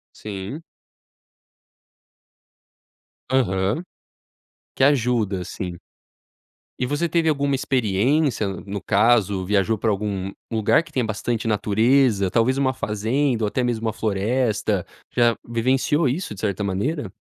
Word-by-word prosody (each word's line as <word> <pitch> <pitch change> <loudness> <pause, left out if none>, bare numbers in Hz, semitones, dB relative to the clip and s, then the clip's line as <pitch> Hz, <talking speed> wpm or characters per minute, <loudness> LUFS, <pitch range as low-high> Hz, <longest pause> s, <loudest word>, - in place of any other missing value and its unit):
Sim. 105 - -7 2.7
Aham. 105 - +1 0.9
Que - - +1
ajuda, 120 -8 +2
assim. 90 0 -5 1.0
E 125 - +1
você 145 +6 0
teve 165 0 +1
alguma 140 -2 +1
experiência 130 0 +1
no 100 +1 -5
caso, 105 -3 +2
viajou 105 +3 +1
pra 110 +2 +1
algum 100 -2 -2 0.2
lugar 110 +5 +3
que 170 - -17
tenha 130 -5 0
bastante 110 +1 -2
natureza, 110 -1 +2
talvez 125 +3 +2
uma 135 -1 +1
fazenda 115 +3 0
ou - - +2
até 125 +5 -1
mesmo 115 -2 -1
uma 110 - 0
floresta, 110 +2 0 0.3
já 120 -1 +4
vivenciou 130 +6 +1
isso 150 - -3
de 95 - -10
certa 105 -1 -1
maneira? 100 - -2
115 Hz, 120 wpm, -22 LUFS, 100-130 Hz, 2.7 s, já